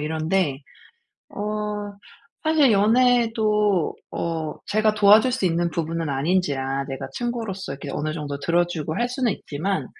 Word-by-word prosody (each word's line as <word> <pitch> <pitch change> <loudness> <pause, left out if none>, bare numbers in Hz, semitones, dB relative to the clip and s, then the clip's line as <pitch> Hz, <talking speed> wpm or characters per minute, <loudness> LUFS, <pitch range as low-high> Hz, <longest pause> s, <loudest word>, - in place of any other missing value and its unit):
이런데. 155 0 0 0.8
어 - - -6 1.0
사실 310 -5 +4
연애도 215 -3 +3 0.2
어 160 -2 -3
제가 215 0 +2
도와줄 215 +4 +6
수 245 -7 0
있는 170 0 0
부분은 165 -1 -2
아닌지라 140 -2 0
내가 135 -1 -5
친구로서 225 - -4
이렇게 140 0 -7
어느 155 +1 -2
정도 145 -3 -4
들어 175 +1 +2
주고 160 -2 -4
할 240 +1 0
수는 250 -2 0
있지만 185 +7 -3
180 Hz, 290 characters per minute, -23 LUFS, 155-220 Hz, 1.0 s, 도와줄